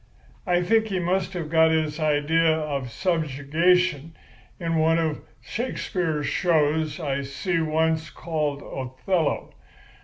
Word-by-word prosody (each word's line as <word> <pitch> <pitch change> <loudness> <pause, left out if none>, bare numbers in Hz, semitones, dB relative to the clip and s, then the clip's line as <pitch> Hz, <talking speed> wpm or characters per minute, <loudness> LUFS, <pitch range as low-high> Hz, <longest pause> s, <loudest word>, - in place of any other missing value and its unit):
I 175 0 +2
think 220 +4 +3
he 195 -3 -2
must 180 +1 0
have 165 -4 -5
got 160 0 +5
his 155 -1 0
idea 155 +2 +2
of 140 -5 -3
subjugation 165 - +1 0.4
from 165 -2 -1
one 160 +1 +3
of 160 -2 -1 0.2
Shakespeare's 180 - -2
shows 160 -1 +1
I 140 -4 -1
see 140 +6 -2
once 160 0 0
called 150 -3 -3
'Othello. 135 +6 -2
160 Hz, 120 wpm, -25 LUFS, 150-175 Hz, 0.4 s, got